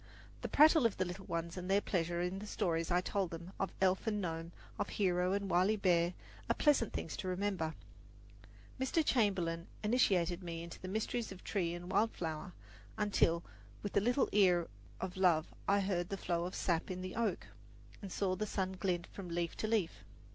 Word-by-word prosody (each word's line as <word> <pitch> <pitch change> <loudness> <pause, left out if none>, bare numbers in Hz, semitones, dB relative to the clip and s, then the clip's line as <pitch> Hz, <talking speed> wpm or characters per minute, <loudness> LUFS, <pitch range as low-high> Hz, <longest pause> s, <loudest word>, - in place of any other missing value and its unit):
The - - -3
prattle 305 -3 +7
of 220 - -7
the 185 - +1
little 180 +2 -7
ones 170 +1 -3
and 180 +1 -5
their 195 +1 +5
pleasure 175 -3 -1
in 180 +2 -2
the 210 - -7
stories 165 -6 0
I 180 0 +3
told 195 -1 -1
them 170 +2 -7
of 195 - -1
elf 190 +3 +2
and 210 -1 +1
gnome, 165 -2 -3 0.3
of - - -1
hero 180 -2 +1
and 200 0 -1
wily 185 +4 +3
bear, 175 -3 +2 0.3
are - - +3
pleasant 285 -7 +3
things 160 - -4
to - - -4
remember. 185 -4 -1 1.0
Mr. 280 +5 +1
Chamberlin 180 -9 +1 0.2
initiated 190 -6 +2
me 170 -2 -5
into 170 0 -9
the 185 - -6
mysteries 220 +3 -2
of 190 - -10
tree 175 -4 -1
and 175 +1 -7
wild 225 +1 +3
flower, 165 +2 -4 0.4
until 175 -5 +2 0.4
with 205 - -3
the 200 - +4
little 245 +5 +2
ear 180 -4 +4 0.3
of 190 -1 -4
love 170 -4 +3
I 200 +1 +4
heard 180 -3 -1
the 195 - -2
flow 170 -2 -1
of 180 - -5
sap 170 -2 0
in 185 0 -4
the 185 - -5
oak, 225 -6 0 0.6
and 195 -3 -7
saw 185 -1 0
the 215 +2 -2
sun 190 -2 -1
glint 180 -2 -1
from 185 -2 -9
leaf 170 0 -2
to 215 - -1
leaf. 215 -7 0
185 Hz, 195 wpm, -35 LUFS, 175-205 Hz, 1.0 s, prattle